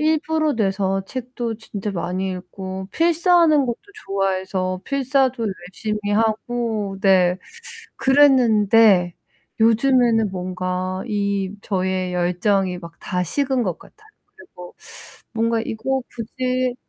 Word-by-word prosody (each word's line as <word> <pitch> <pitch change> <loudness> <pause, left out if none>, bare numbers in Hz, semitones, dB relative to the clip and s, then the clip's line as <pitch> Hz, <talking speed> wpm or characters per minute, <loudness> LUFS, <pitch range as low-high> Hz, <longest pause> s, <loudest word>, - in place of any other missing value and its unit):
일부러 310 -1 +1
내서 195 -2 0
책도 240 -1 -5
진짜 210 -2 -5
많이 185 +1 -3
읽고 190 +1 -7
필사하는 335 -3 +3
것도 235 -1 -2 0.3
좋아해서 190 -1 -1
필사도 265 -3 +1
열심히 205 +3 -4
하고 220 -1 -1
네 185 -2 +4 0.6
그랬는데 225 -9 +4 0.5
요즘에는 230 -1 +3
뭔가 185 0 -3
이 200 -2 -1
저의 185 -2 -1
열정이 180 +1 +1
막 170 -1 -10
다 180 -1 -2
식은 265 - 0
것 180 -6 -2
같아요. 435 0 -19 0.3
그리고 180 - -13 0.6
뭔가 230 0 +1
이거 260 +4 -2
굳이 255 +2 -2
210 Hz, 230 characters per minute, -21 LUFS, 185-255 Hz, 0.6 s, 네